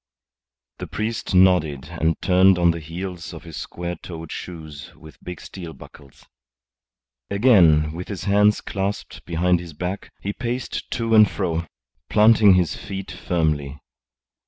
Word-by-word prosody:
The - - -5
priest 110 -2 -3
nodded 80 -7 +3
and 80 -1 -1
turned 95 0 +5
on 85 -1 +4
the 85 - -5
heels 85 +2 -7
of 80 - -10
his 80 -2 -10
square 85 0 -5
toed 80 -3 -9
shoes 80 -5 -8
with 80 -1 -16
big 90 0 -7
steel 85 -4 -9
buckles. 70 -3 -16 1.0
Again, 90 -9 +4
with 90 +2 -6
his 95 -4 -6
hands 105 +1 +3
clasped 100 +1 -4
behind 90 +1 +1
his 85 -2 -9
back, 90 +6 -5
he 100 - -4
paced 120 +2 -4
to 115 -2 -1
and 110 -2 +7
fro, 85 0 -2 0.4
planting 105 -2 +6
his 90 -4 +1
feet 95 -1 -7
firmly. 75 -5 -1
90 Hz, 140 wpm, -22 LUFS, 80-100 Hz, 1.0 s, and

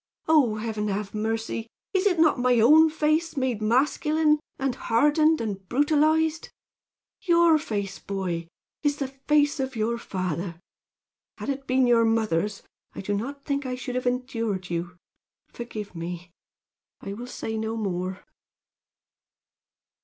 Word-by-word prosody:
Oh, 290 -9 +4
Heaven, 215 -1 -3
have 200 0 -3
mercy! 225 +1 -2 0.3
Is 380 +1 +3
it 360 -3 +2
not 315 -5 +4
my 250 -1 +3
own 310 +8 +7
face 310 +1 0
made 255 -5 -1
masculine, 300 +6 +2 0.2
and 270 -1 -1
hardened 295 +7 +3
and 195 -4 -5
brutalized? 310 +3 +2 0.7
Your 340 -3 +4
face, 200 -8 -4
boy, 180 -4 -3 0.3
is 290 -1 +1
the 275 -3 -3
face 290 +2 +1
of 265 -1 -2
your 230 +2 -1
father. 180 -4 -4 0.8
Had - - -5
it 275 0 -3
been 255 0 +3
your 235 -1 +4
mother's, 210 -3 0 0.3
I - - -5
do 205 +1 -2
not 275 +7 -4
think 280 -1 -1
I 250 - -2
should 250 0 -5
have 250 0 -1
endured 230 -7 -2
you. 175 +1 -3 0.5
Forgive 220 -4 -7
me! 175 +1 -6 0.7
I 200 - -5
will 240 +4 -7
say 220 -2 -5
no 220 +1 -2
more." 185 -3 -3
240 Hz, 140 wpm, -26 LUFS, 205-290 Hz, 0.8 s, own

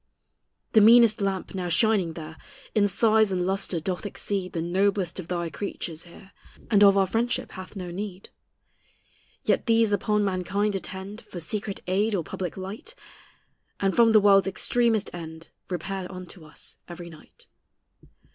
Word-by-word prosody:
The 220 - +7
meanest 230 0 +7
lamp 195 -1 -2
now 180 -2 -3
shining 195 -2 +2
there 160 -1 -8 0.4
In 205 -1 +3
size 220 0 +3
and 180 -1 0
lustre 190 -2 0
doth 180 +2 -3
exceed 200 -2 -3
The 165 - -2
noblest 190 +1 0
of 175 - -7
thy 170 -2 -2
creatures 165 -1 -6
here, 190 +3 -15 0.4
And 205 -2 +6
of 200 -1 +7
our 195 - +4
friendship 230 +6 -1
hath 185 +2 -10
no 180 -3 -6
need. 195 0 -6 1.1
Yet - - +1
these 225 -2 +3
upon 210 0 +1
mankind 195 +2 0
attend 195 +2 -6
For 175 - -9
secret 200 +4 -3
aid 205 +4 +1
or 175 - -1
public 180 +3 -5
light; 205 - -7 0.8
And 195 -1 +1
from 230 -1 +6
the 220 - +7
world's 200 -1 +5
extremest 225 +2 +1
end 160 -1 -8 0.2
Repair 185 +1 -4
unto 180 -2 -9
us 150 - -9
every 175 0 -9
night. 155 - -16
195 Hz, 155 wpm, -26 LUFS, 180-210 Hz, 1.1 s, The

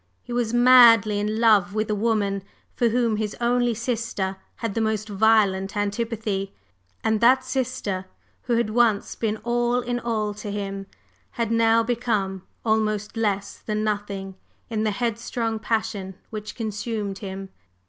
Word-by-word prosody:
He 240 - -7
was 240 -2 0
madly 235 -4 +7
in 210 +1 -1
love 210 -4 +4
with 215 0 0
a - - +2
woman 205 -2 0 0.3
for 235 - +2
whom 230 -2 +1
his 210 -1 -2
only 240 0 +2
sister 225 -5 -2 0.2
had 230 -4 -3
the 225 - -1
most 220 -1 -1
violent 205 -2 +2
antipathy; 205 -1 -2 0.5
and 220 -1 +1
that 260 +2 +5
sister, 255 -8 -2 0.4
who 240 - +1
had 230 -2 +1
once 225 -3 +2
been 220 -1 -2
all 240 +1 +1
in 245 0 -2
all 215 -3 -1
to 210 0 -7
him, 195 -1 -4 0.5
had 230 -2 -1
now 230 0 +4
become 220 -5 -1 0.2
almost 215 -1 0
less 205 -3 -1
than 215 0 -2
nothing 200 -2 -3 0.4
in 220 -1 -1
the - - +2
headstrong 230 +1 -2
passion 215 -4 -2 0.2
which 215 -1 -6
consumed 215 -2 -3
him. 195 -1 -6
220 Hz, 150 wpm, -24 LUFS, 205-235 Hz, 0.5 s, madly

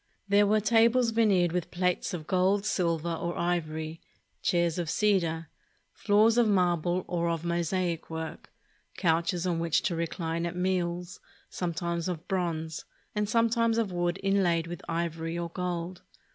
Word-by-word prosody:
There 200 +1 +4
were 215 +1 +4
tables 230 +2 +4
veneered 200 -7 +3
with 180 -1 -2
plates 180 0 0
of 165 -4 -5
gold, 190 +3 +2
silver, 170 -4 0
or 170 +1 -3
ivory, 160 -2 -2 0.4
chairs 170 -1 +1
of 170 -3 -2
cedar, 170 -6 +1 0.5
floors 220 +3 +3
of 235 - +4
marble 180 -2 +1
or 170 -1 0
of 165 0 -2
mosaic 170 0 -1
work, 160 0 -6 0.5
couches 170 +1 +1
on 175 -2 0
which 165 -2 +1
to 170 - 0
recline 165 0 -2
at 170 - -5
meals, 180 -1 -1 0.3
sometimes 170 -1 -2
of 175 -1 -4
bronze, 165 -4 -2 0.3
and 210 -1 -1
sometimes 230 0 +2
of 225 -4 0
wood 175 +1 -1
inlaid 185 -4 +2
with 175 0 -7
ivory 165 0 -2
or 170 0 -3
gold. 180 0 -4
175 Hz, 145 wpm, -28 LUFS, 170-195 Hz, 0.5 s, There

